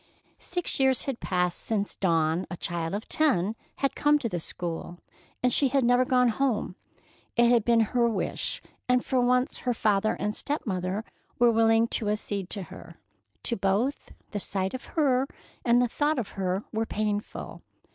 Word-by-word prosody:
Six 355 -4 -3
years 265 -2 +3
had 270 -4 -3
passed 180 -2 0
since 205 -2 -2
Dawn, 165 -1 +1
a 180 - -5
child 170 +1 -2
of 210 - -5
ten, 220 - +1 0.2
had 275 - 0
come 295 0 +4
to 260 - -2
the 180 -5 -3
school, 170 +1 -5 0.5
and 250 -1 +4
she 280 - +5
had 270 0 +2
never 245 +1 +4
gone 250 -1 +4
home. 230 -5 0 0.6
It 235 0 +5
had 235 -3 +4
been 235 0 +4
her 235 +2 +2
own 230 -2 +1
wish, - - -3 0.3
and 250 0 +3
for 255 -1 +2
once 250 +3 +2
her 245 -1 -1
father 215 -1 +2
and 210 0 -2
stepmother 200 -7 -2 0.3
were 240 -1 +5
willing 225 0 +4
to 210 - -1
accede 205 -3 -2
to 200 -3 -2
her. - - -11 0.5
To 235 - +1
both, 200 +8 0 0.2
the 205 - -2
sight 190 -1 -2
of 260 - -6
her 270 -3 +3 0.4
and 240 0 +4
the 245 - +3
thought 295 +5 0
of 235 -5 -2
her 190 0 -2
were 225 0 -1
painful. 210 -1 -3
225 Hz, 175 wpm, -27 LUFS, 195-250 Hz, 0.6 s, she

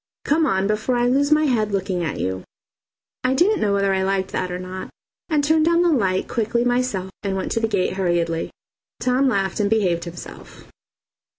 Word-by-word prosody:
Come 310 +2 +2
on 190 0 +1
before 215 +4 0
I 240 - +2
lose 280 +4 +2
my 305 0 +5
head 220 -6 +1
looking 190 -2 -1
at 155 - -3
you." 95 +1 -3 0.8
I 255 +1 +2
didn't 375 +7 +3
know 205 - +2
whether 200 -1 +2
I 190 - +1
liked 190 0 -1
that 185 - -2
or 180 - -3
not, 185 +1 -7 0.4
and 300 -3 +1
turned 315 +2 +3
down 340 +1 +3
the 350 - +3
light 190 -10 +1
quickly 235 +1 0
myself 245 -7 0
and 195 -1 -2
went 190 - -3
to - - +1
the 225 - +1
gate 200 -5 0
hurriedly. 170 -3 0 0.5
Tom 255 +2 +2
laughed 195 -4 -1
and 205 -1 +1
behaved 185 -6 +1
himself. 170 0 -10
205 Hz, 195 wpm, -22 LUFS, 185-255 Hz, 0.8 s, my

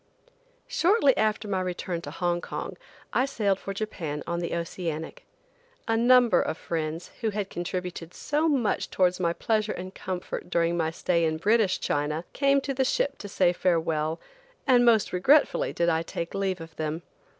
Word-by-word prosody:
SHORTLY 400 - +3
after 215 0 0
my 190 -2 0
return 180 -1 -3
to - - -7
Hong 175 -1 -1
Kong - - -5 0.4
I 255 - +3
sailed 205 -8 0
for 195 - -5
Japan 180 -8 -4
on 170 0 -2
the 170 -1 -2
Oceanic. 170 -2 -5 0.6
A 225 - +2
number 245 +1 +5
of - - -2
friends, 160 0 -4
who 225 - +1
had 205 -2 -3
contributed 175 -1 -4
so 305 +2 0
much 250 -8 0
towards 180 -1 +2
my 170 -2 +1
pleasure 215 +4 0
and 185 +1 -7
comfort 185 -1 -5
during 170 -1 +1
my 160 -2 +1
stay 170 +1 0
in 160 -1 +1
British 210 +2 +2
China, 150 +3 -1
came 275 0 +3
to 275 - -3
the 265 0 +1
ship 275 +1 0
to 205 - -7
say 180 -2 +3
farewell, 165 -3 0 0.5
and 250 -3 +5
most 230 -3 +4
regretfully 275 +12 +3
did 170 - 0
I 160 -1 +2
take 170 0 -5
leave 190 -3 -1
of 165 0 -10
them. 155 +2 -3
185 Hz, 170 wpm, -27 LUFS, 170-225 Hz, 0.6 s, number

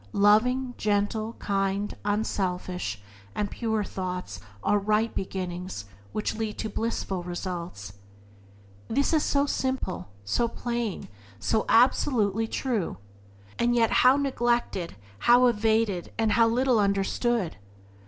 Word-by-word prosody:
Loving, 245 +5 +3
gentle, 215 +2 0
kind, 195 0 -1
unselfish 185 - -2 0.4
and 205 -1 -1
pure 220 -2 -1
thoughts 180 - -5 0.2
are 205 - +3
right 215 +3 +1
beginnings, 180 - -4 0.3
which 210 - -2
lead 220 -1 -3
to 220 - -3
blissful 205 -4 -2
results. 175 - -5 0.9
This 280 +7 +1
is 310 - +4
so 280 0 +2
simple, 260 - -2
so 235 - +1
plain, 235 -3 -3 0.3
so 215 - 0
absolutely 225 -3 +3
true! 225 - -2 0.6
and 240 0 +2
yet 230 -2 +3
how 255 +2 +6
neglected, 240 - 0 0.2
how 245 - +6
evaded, 220 -5 +1
and 220 -1 +2
how 230 +2 +5
little 245 0 +2
understood! 200 - 0
215 Hz, 115 wpm, -27 LUFS, 190-235 Hz, 0.9 s, how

